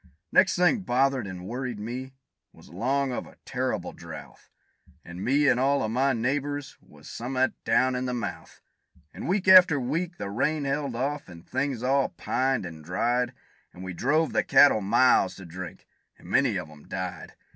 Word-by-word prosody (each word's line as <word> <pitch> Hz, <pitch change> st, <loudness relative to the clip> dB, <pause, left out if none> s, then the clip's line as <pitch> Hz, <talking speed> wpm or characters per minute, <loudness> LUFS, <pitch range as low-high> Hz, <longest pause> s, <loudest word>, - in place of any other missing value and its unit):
Next 190 Hz, -, +4 dB
thing 180 Hz, +6 st, +3 dB
bothered 135 Hz, -, +1 dB
and 90 Hz, -1 st, -8 dB
worried 125 Hz, +2 st, -4 dB
me, 130 Hz, +5 st, -6 dB, 0.4 s
was -, -, -17 dB
'long 130 Hz, +8 st, 0 dB
of 125 Hz, -, -4 dB
a -, -, -17 dB
terrible -, -, -3 dB
drouth; -, -, -11 dB, 0.6 s
And 85 Hz, +2 st, -8 dB
me 145 Hz, +3 st, +3 dB
an' 125 Hz, -, +4 dB
all 140 Hz, +1 st, +2 dB
o' -, -, 0 dB
my 130 Hz, +4 st, +2 dB
neighbors 140 Hz, +4 st, -2 dB
was -, -, -17 dB
some'at 130 Hz, +2 st, -1 dB
down 130 Hz, 0 st, +3 dB
in 125 Hz, 0 st, -2 dB
the 125 Hz, -, -2 dB
mouth. 120 Hz, -, -6 dB, 0.5 s
And -, -, -7 dB
week 190 Hz, +2 st, 0 dB
after 185 Hz, -5 st, +8 dB
week 165 Hz, +8 st, -2 dB
the 100 Hz, -, -5 dB
rain 150 Hz, +8 st, 0 dB
held 140 Hz, -2 st, -2 dB
off, 140 Hz, 0 st, -3 dB
and 85 Hz, -1 st, -13 dB
things 130 Hz, -2 st, -2 dB
all 135 Hz, +1 st, +2 dB
pined 130 Hz, -5 st, -1 dB
an' 80 Hz, -3 st, -9 dB
dried, 120 Hz, +9 st, 0 dB, 0.4 s
And 90 Hz, -, -10 dB
we 95 Hz, -1 st, -5 dB
drove 150 Hz, -, +1 dB
the -, -, +2 dB
cattle 140 Hz, -7 st, +5 dB
miles 100 Hz, -3 st, +3 dB
to 95 Hz, -, -11 dB
drink, 90 Hz, 0 st, -9 dB, 0.3 s
and -, -, -16 dB
many -, -, +2 dB
of -, -, -5 dB
'em 75 Hz, -1 st, -16 dB
died. 95 Hz, -2 st, -6 dB
130 Hz, 180 wpm, -26 LUFS, 105-140 Hz, 0.6 s, after